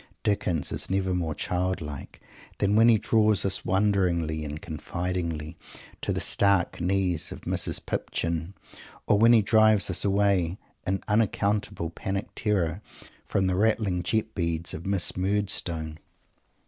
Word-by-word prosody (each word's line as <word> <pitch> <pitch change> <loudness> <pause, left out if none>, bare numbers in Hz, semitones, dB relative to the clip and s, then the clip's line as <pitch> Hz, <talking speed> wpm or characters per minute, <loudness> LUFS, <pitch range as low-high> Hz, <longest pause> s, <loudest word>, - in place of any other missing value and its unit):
Dickens 90 -6 0
is - - -2
never 95 -1 0
more 85 -4 -2
childlike 90 -6 -3 0.4
than 100 +1 +1
when 115 +2 +6
he 115 - +6
draws 110 -2 +2
us, 95 -1 0
wonderingly 90 -5 +1
and 75 0 -5
confidingly, 85 0 -4 0.5
to - - -2
the - - -1
stark 100 -4 +2
knees 90 -2 0
of - - -9
a - - -17
Mrs. - - -2
Pipchin, 85 +3 -3 0.5
or 105 - +3
when 115 +2 +6
he 115 -3 +6
drives 110 -2 +4
us 90 - 0
away, 100 -3 +2 0.3
in 95 0 -1
unaccountable 105 -4 0
panic 95 +3 -4
terror, 95 -5 -1 0.5
from 95 - +1
the 95 -1 +1
rattling 105 -3 +1
jet 110 +3 -1
beads 85 -3 -2
of 80 - -7
a - - -4
Miss 100 -3 +1
Murdstone. 90 -5 -1
95 Hz, 145 wpm, -26 LUFS, 85-100 Hz, 0.5 s, when